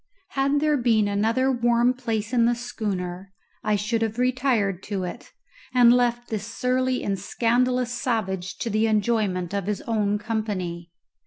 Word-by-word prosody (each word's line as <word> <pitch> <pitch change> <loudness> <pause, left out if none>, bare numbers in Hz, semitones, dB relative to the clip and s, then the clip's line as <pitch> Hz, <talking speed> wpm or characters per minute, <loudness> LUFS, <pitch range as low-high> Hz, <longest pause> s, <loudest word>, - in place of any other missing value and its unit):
Had 275 +1 +1
there 300 -1 +3
been 225 -4 +2
another 225 +6 +1
warm 240 0 +3
place 225 -3 -3
in 235 -2 +4
the 240 - +2
schooner 195 -6 -4 0.3
I 210 - +2
should 215 +3 -1
have 225 0 -1
retired 250 -7 +1
to 200 -3 -3
it, 180 - -7 0.4
and 240 -1 +7
left 240 -1 +1
this 215 -1 -3
surly 255 +2 0
and 195 -1 -1
scandalous 245 +4 +1
savage 190 -7 -2
to 230 - -3
the 215 +2 +2
enjoyment 210 -5 0
of 200 -2 -2
his 210 -1 -2
own 210 -2 0
company. 200 -6 -3
225 Hz, 155 wpm, -24 LUFS, 200-245 Hz, 0.4 s, and